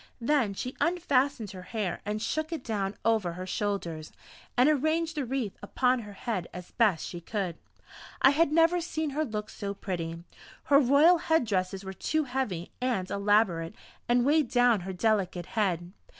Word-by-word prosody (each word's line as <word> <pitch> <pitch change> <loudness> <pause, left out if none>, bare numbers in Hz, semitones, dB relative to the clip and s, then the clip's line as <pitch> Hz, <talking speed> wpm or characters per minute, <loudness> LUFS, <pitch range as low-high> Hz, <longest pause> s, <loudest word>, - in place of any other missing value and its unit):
Then 240 -5 +1
she 250 +6 -5
unfastened 280 - +1
her 185 -2 -9
hair 195 -3 -3
and 210 +1 -1
shook 310 +8 -2
it 320 -6 -4
down 200 -3 -2
over 220 -6 +2
her 185 +2 -6
shoulders, 180 -6 -3 0.5
and 250 +3 +6
arranged 315 +2 +1
the 290 -3 -1
wreath 245 -5 -2
upon 250 +4 +1
her 210 -3 -9
head 200 -4 -3
as 180 -1 -9
best 205 -9 +2
she 175 - -7
could. 185 -2 -3 0.6
I 265 - +6
had 300 +1 +2
never 330 +2 +4
seen 315 -3 -3
her 305 +3 0
look 215 -6 -4
so 200 -1 -5
pretty; 170 -4 -4 0.4
her 280 -1 +5
royal 295 +6 +5
head 320 -5 +2
dresses 190 -2 -1
were 190 0 -6
too 310 +10 0
heavy 245 - -3
and 235 -8 -1
elaborate 200 -3 +2 0.3
and 240 0 +3
weighed 295 -2 +3
down 245 -3 +4
her 190 +1 -6
delicate 185 -3 0
head. 180 -5 -1
220 Hz, 170 wpm, -28 LUFS, 190-280 Hz, 0.6 s, and